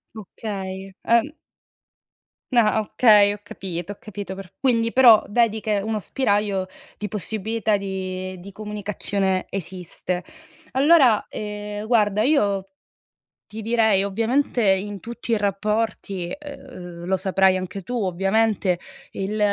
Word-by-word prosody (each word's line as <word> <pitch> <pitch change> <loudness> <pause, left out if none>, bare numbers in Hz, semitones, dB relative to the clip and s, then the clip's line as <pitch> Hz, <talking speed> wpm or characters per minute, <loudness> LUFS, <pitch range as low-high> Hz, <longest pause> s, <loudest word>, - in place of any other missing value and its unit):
Okay. 195 -2 -6
Ehm 235 +5 +3 1.2
Na 225 -3 +4
ah, 220 - +2
okay, 210 -2 +5
ho 205 - -5
capito 190 -2 -6
ho - - -21
capito 200 -2 -7
perf 190 -2 -11
quindi 230 -3 +2
però 235 -4 +7
vedi 220 -1 +2
che 210 0 0
uno 215 +1 -2
spiraglio 205 -5 0 0.3
di 210 - -4
possibilità 215 +1 -1
di 185 -1 -4
di 200 +2 -10
comunicazione 200 -2 -1
esiste. 180 -1 -4 0.5
Allora, 270 -5 +5
ehm, 210 0 -5
guarda, 210 -3 +3
io 200 -9 +2 0.8
ti 220 - -8
direi 220 -3 +3
ovviamente 230 +5 0
in 200 0 +1
tutti 235 +2 -5
i 225 - +4
rapporti, 200 -2 -1
uhm, 175 -10 -9
lo 190 +1 0
saprai 190 -1 +3
anche 185 +2 -6
tu 245 - -6
ovviamente, 195 0 +1 0.3
il 200 +3 -3
205 Hz, 125 wpm, -23 LUFS, 190-220 Hz, 1.2 s, però